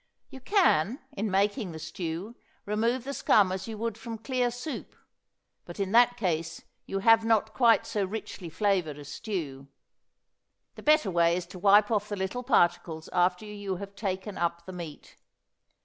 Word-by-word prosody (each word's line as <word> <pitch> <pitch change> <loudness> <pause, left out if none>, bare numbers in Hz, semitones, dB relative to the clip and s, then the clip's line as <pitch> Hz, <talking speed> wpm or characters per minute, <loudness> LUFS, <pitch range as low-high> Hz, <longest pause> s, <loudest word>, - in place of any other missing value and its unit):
You 265 - -9
can, 260 - +2
in 210 +2 -3
making 200 0 0
the - - -7
stew, 165 +6 -5 0.3
remove 230 +4 0
the 280 +2 -5
scum 200 -8 +4
as 190 +2 -4
you 220 -1 -6
would 225 0 -3
from 225 0 -6
clear 245 +2 0
soup, 245 +5 -6 0.7
but 175 - -10
in 195 -1 -1
that 245 +1 +5
case 165 -5 -2 0.2
you 195 0 -2
have 225 +1 +6
not 220 -1 +2
quite 230 -2 +4
so 220 -3 -1
richly 195 -3 -6
flavored 180 -5 0
a 145 - -10
stew. 145 -6 -5 1.1
The - - -11
better 305 -9 +3
way 170 -1 +3
is 180 - -4
to 180 +1 -11
wipe 205 +3 +5
off 210 -1 0
the 205 - -2
little 190 +5 -3
particles 175 -9 +1
after 180 +3 +2
you 205 -2 -5
have 200 +2 -8
taken 195 0 -4
up 170 0 -1
the 185 - -8
meat. 170 -4 -9
200 Hz, 170 wpm, -28 LUFS, 175-225 Hz, 1.1 s, have